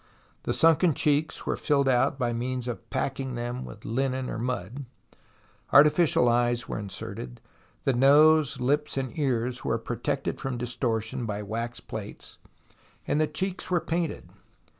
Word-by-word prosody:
The - - +2
sunken 165 -1 +4
cheeks 150 +1 +1
were - - 0
filled 140 -2 +1
out 130 +1 +2
by 120 -3 0
means 125 +1 -3
of 120 - -6
packing 130 -2 -2
them 120 +2 -4
with 105 - -11
linen 130 +2 -1
or - - -4
mud, 125 +2 -4 0.9
artificial 150 -2 +5
eyes 120 0 +2
were - - -4
inserted, 90 - -7 0.4
the 135 - +2
nose, 145 +2 +5
lips, 145 +3 0
and 130 +1 -3
ears 125 -3 -1
were - - 0
protected - - -3
from 135 -2 -3
dis 120 +1 -4
tortion 115 0 -2
by 105 0 -3
wax 115 +3 -4
plates, - - -8 0.7
and 150 - +1
the 155 - +2
cheeks 190 +2 -3
were 180 -1 +2
painted. 170 -1 -3
130 Hz, 150 wpm, -27 LUFS, 120-145 Hz, 0.9 s, artificial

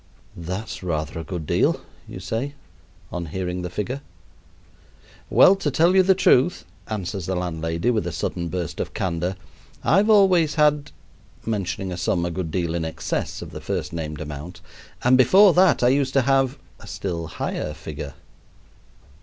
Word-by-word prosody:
"That's 90 +6 -5
rather 80 -3 -3
a - - -5
good 85 -1 -5
deal," - - +2 0.3
you - - -8
say 115 +10 -3 0.6
on 85 -1 -4
hearing 90 +2 -3
the 90 - -4
figure. 105 +9 -4 1.3
"Well, 195 - +7
to - - -1
tell 170 +3 +3
you 190 - +7
the 190 +1 +4
truth," 175 -3 +3 0.2
answers 95 -4 -4
the 95 - -1
landlady 85 +3 -1
with 110 -3 -1
a - - -2
sudden 85 -1 -3
burst 85 -2 -4
of - - -4
candor, 90 +1 -1 0.5
"I've 200 +5 +3
always 185 -8 +5
had" 150 -1 +3 0.6
(mentioning 95 -3 -2
a 90 - -4
sum 85 0 0
a 85 - -2
good 85 -1 -3
deal 85 0 -1
in 85 -1 -1
excess 80 - -3
of - - -10
the - - -8
first - - -3
named 75 -2 -5
amount), 75 +4 -7 0.4
"and 130 +1 +5
before 190 - +7
that 185 -7 +4
I 120 - +6
used 135 0 +1
to 135 - +4
have" 135 0 +2 0.2
(a - - -13
still 85 -4 -4
higher 75 0 -4
figure). 75 -3 -7
95 Hz, 165 wpm, -23 LUFS, 85-135 Hz, 1.3 s, Well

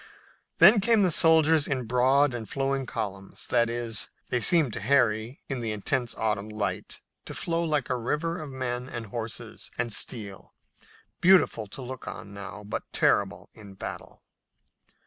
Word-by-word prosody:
Then 195 +5 +8
came 225 -1 +4
the 180 - +3
soldiers 160 -1 +4
in 135 -3 -1
broad 130 +4 +3
and 115 -3 -6
flowing 135 -1 -1
columns, 100 -3 -5
that 120 -1 +2
is, 115 -2 -2 0.2
they 125 - +1
seemed 155 -3 +3
to - - -4
Harry, 115 0 +1
in 135 -2 -3
the 115 -2 -2
intense 120 +4 -1
autumn 105 -1 -1
light, 105 -1 -3 0.2
to - - -7
flow 165 0 -1
like 150 -6 0
a 125 - +1
river 160 +8 -2
of 150 - -7
men 130 -1 -4
and 120 -1 -5
horses 110 +1 -6
and 115 -2 -1
steel, 105 -5 -3 0.6
beautiful 175 - +4
to 130 +6 -8
look 130 0 -8
on 100 - -7
now, 100 +1 -8
but 105 - -6
terrible - - +1
in 100 -3 -13
battle. - - -8
125 Hz, 160 wpm, -27 LUFS, 110-145 Hz, 0.6 s, Then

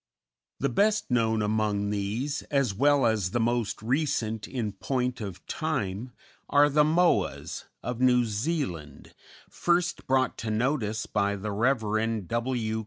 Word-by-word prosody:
The - - +1
best 210 - +1
known 110 -3 +2
among 105 -1 0
these, 110 +8 -2
as 140 -7 +1
well 140 +5 +3
as 110 -5 +1
the 120 - -1
most 115 -2 0
recent 115 -5 -1
in 120 -5 -3
point 125 +4 -2
of 100 -4 -7
time, 125 -6 -3 0.4
are 145 +1 +5
the 150 +1 +4
Moas 170 +3 +1 0.2
of 125 0 -4
New 125 -1 +4
Zealand, 105 - -3 0.3
first 175 0 0
brought 130 -1 +1
to 110 - -3
notice 110 -1 0
by 100 -1 0
the 100 +1 -4
Rev. 110 -2 0
W. 115 -1 -1
115 Hz, 135 wpm, -27 LUFS, 105-135 Hz, 0.4 s, are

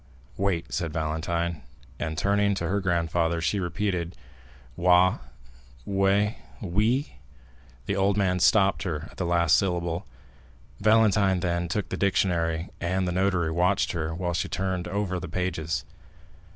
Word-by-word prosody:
"Wait," 95 -4 -1
said 85 -2 -2
Valentine; 80 +2 -2 0.4
and, 80 -1 -3
turning 100 +2 +2
to 85 -3 -2
her 100 +4 0
grandfather, 85 -2 0
she 90 +5 0
repeated, 90 -1 -2 0.6
"Wa—We—Wi——" 90 - 0 0.7
The 100 - -1
old 100 +1 +2
man 90 -2 +1
stopped 100 +1 +4
her 80 -4 -4
at - - -18
the 90 - -2
last 85 -1 +4
syllable. 85 -3 -1 0.7
Valentine 105 -3 +3
then 85 0 -1
took 100 +4 -2
the 95 - -3
dictionary, 85 -4 +1
and 90 +2 -1
the - - 0
notary 90 -3 +1
watched 90 +4 +1
her 80 -2 -3
while 90 0 -2
she 80 - -2
turned 95 0 -2
over 95 -1 -2
the 90 - -7
pages. 85 -3 -2
90 Hz, 130 wpm, -26 LUFS, 85-100 Hz, 0.7 s, stopped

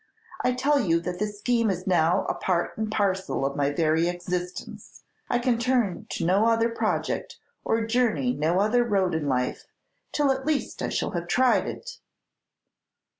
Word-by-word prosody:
I 250 - +2
tell 280 +3 +2
you 170 -9 +2
that 180 +1 -5
this 210 0 -3
scheme 230 +1 +1
is 185 -1 -3
now 175 -2 +2
a - - -1
part 175 -2 -1
and 215 0 -3
parcel 190 -8 0
of 140 0 -2
my 145 -1 +1
very 160 +2 +1
existence. 175 0 -5 0.3
I 245 - +2
can 240 -1 +1
turn 240 -6 0
to 165 - -3
no 195 +6 +3
other 230 0 +3
project, 230 - -2 0.3
or 225 0 0
journey 225 - +1
no 155 +6 +1
other 220 +4 +3
road 195 -6 +1
in 160 -2 -1
life, 125 -2 -1 0.4
till 290 -2 +2
at 265 0 -2
least 300 0 -2
I - - -1
shall - - -1
have 175 -1 -4
tried 255 +6 +3
it!" 480 -1 -7
200 Hz, 175 wpm, -26 LUFS, 170-240 Hz, 0.4 s, no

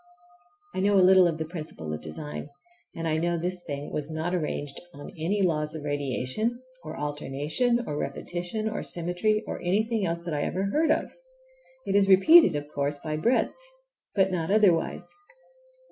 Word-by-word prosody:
I - - -3
know 200 +1 +3
a 185 -2 +6
little 185 -1 +7
of 165 -2 -1
the 160 - -3
principle 155 - -7
of 75 - -5
design, 150 - -7 0.5
and 165 0 -3
I 155 -1 +1
know 170 +1 0
this 180 +2 -2
thing 145 -3 -6
was 150 0 -3
not 160 +3 -2
arranged 145 -4 -3
on 145 - -9
any 185 +5 -1
laws 155 -3 0
of 155 - -6
radiation, 145 - -2 0.2
or 155 - -7
alternation, 150 - -1
or 150 - -4
repetition, 175 +9 -3
or 220 - -3
symmetry, 180 +6 0
or - - -5
anything 215 +4 +1
else 170 -1 -2
that 170 - -3
I 145 - -1
ever 185 +5 -1
heard 315 +4 +2
of. - - +1 0.7
It 195 -1 -1
is 200 -1 +4
repeated, 195 - +7
of 145 0 -3
course, 145 0 -2
by 155 +1 -4
the 155 - -4
breadths, 250 - +1 0.5
but 190 -2 +3
not 170 -2 -2
otherwise. 200 -5 +2
170 Hz, 175 wpm, -27 LUFS, 150-195 Hz, 0.7 s, little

